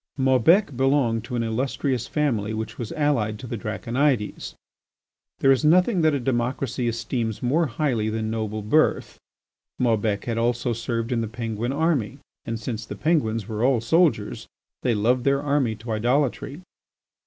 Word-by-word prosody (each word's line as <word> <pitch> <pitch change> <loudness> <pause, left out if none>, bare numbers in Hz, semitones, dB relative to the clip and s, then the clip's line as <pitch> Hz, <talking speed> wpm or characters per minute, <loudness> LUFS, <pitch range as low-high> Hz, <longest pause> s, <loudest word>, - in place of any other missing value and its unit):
Maubec 135 +6 +3
belonged 130 -4 +2
to 125 +1 -5
an 120 - 0
illustrious 125 +2 -1
family 115 -8 -1
which 110 0 -5
was 115 -3 -4
allied 125 -8 0
to 125 - -9
the 120 0 -4
Draconides. 115 +3 -1 0.9
There 135 - +5
is 135 +2 +2
nothing 180 +5 +4
that 155 -2 +3
a - - 0
democracy 125 0 -1
esteems 115 -1 -2
more 155 +7 +2
highly 120 -4 -1
than 110 0 -2
noble 110 -1 -3
birth. 155 +10 +1 0.6
Maubec 110 -4 0
had 115 -1 -1
also 120 +1 0
served 115 +1 -3
in 120 -2 +1
the 115 - -2
Penguin 115 +1 -3
army, 145 -7 0 0.3
and 115 0 -3
since 110 -1 -4
the - - -7
Penguins 115 - 0
were 110 +1 -3
all 130 -1 +3
soldiers, 140 - +1 0.3
they 120 -3 +1
loved 120 +4 +2
their 140 0 +2
army 140 -5 0
to 115 +2 -8
idolatry. 130 +6 0
120 Hz, 155 wpm, -24 LUFS, 110-140 Hz, 0.9 s, There